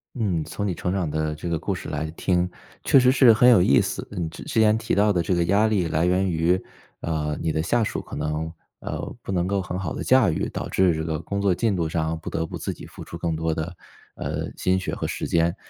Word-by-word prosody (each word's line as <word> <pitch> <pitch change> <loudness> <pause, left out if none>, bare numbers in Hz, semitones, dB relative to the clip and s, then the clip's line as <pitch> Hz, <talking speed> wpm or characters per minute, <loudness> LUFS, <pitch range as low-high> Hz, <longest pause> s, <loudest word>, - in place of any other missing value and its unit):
嗯。 95 -10 0
从 100 +6 -4
你 95 - -1
成 90 +2 -2
长 95 -5 -1
的 80 0 -1
这 80 +3 -6
个 85 -1 0
故 - - -2
事 - - -7
来 80 +2 -3
听， 90 +1 0 0.3
确 - - +6
实 125 0 +5
是 130 -3 +7
很 120 +3 +5
有 115 -7 +7
意 70 - +5
思。 - - -3
嗯， 85 -2 -3
之 - - -10 0.2
前 110 0 +5
提 110 - -1
到 105 +2 +3
的 90 -3 +1
这 95 - 0
个 85 -1 +2
压 100 +5 +3
力 100 -5 +1
来 80 +1 +1
源 90 +2 +2
于， 85 +2 +1 0.4
呃， 75 -2 -2
你 80 - -1
的 80 - 0
下 115 +8 +1
属 110 - -2
可 - - -9
能， 80 +1 -2 0.3
呃， - - -4 0.2
不 - - -5
能 90 -1 +1
够 100 +1 0
很 90 0 -4
好 95 -5 -3
地 - - -4
驾 130 -5 +5
驭， 80 - -1
导 - - -4
致 95 -3 +3
这 80 - -2
个 80 -1 -2
工 100 +4 -3
作 100 -2 +3
进 110 +2 +1
度 85 -3 -1
上 80 0 -1
不 80 - -7
得 80 - -2
不 - - -6
自 - - -3
己 - - -11
付 - - -11
出 - - -9
更 85 -1 -2
多 80 0 -1
的， 80 +2 -4 0.4
呃， - - -3
心 95 0 +1
血 95 - -3
和 - - -3
时 - - -3
间。 85 0 +1
90 Hz, 280 characters per minute, -24 LUFS, 80-100 Hz, 0.4 s, 是